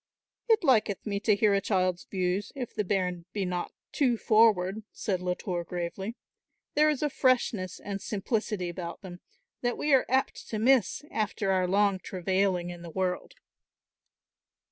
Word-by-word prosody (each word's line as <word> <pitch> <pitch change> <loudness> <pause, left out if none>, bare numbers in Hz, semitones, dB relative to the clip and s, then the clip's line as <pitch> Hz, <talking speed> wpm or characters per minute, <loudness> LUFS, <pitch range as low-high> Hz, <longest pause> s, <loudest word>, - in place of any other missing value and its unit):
"It 445 -4 +4
liketh 220 - +2
me 200 -2 -1
to 210 0 +3
hear 210 0 +3
a 200 - +2
child's 185 -3 0
views, 185 +1 -1
if 250 -4 -5
the 210 - -1
bairn 180 -3 -1
be 200 -2 -1
not 180 -1 -3 0.2
too 250 -5 +2
forward," 215 -3 +3
said 185 -3 -2
Latour 180 0 -2
gravely. 180 +5 -4 0.6
"There 305 +1 +4
is 300 -1 -1
a 295 - +2
freshness 230 -9 +1
and 200 -1 -5
simplicity 210 -2 -2
about 175 0 -6
them 180 -2 -9 0.4
that 245 -1 -1
we 295 -1 +1
are 265 - +4
apt 265 +1 0
to 220 - -2
miss 255 +3 +3
after 210 -2 -1
our 185 -1 +2
long 200 0 +2
travailing 185 -1 0
in 175 -1 -9
the 170 - -8
world." 180 +1 -2
195 Hz, 160 wpm, -29 LUFS, 180-225 Hz, 0.6 s, It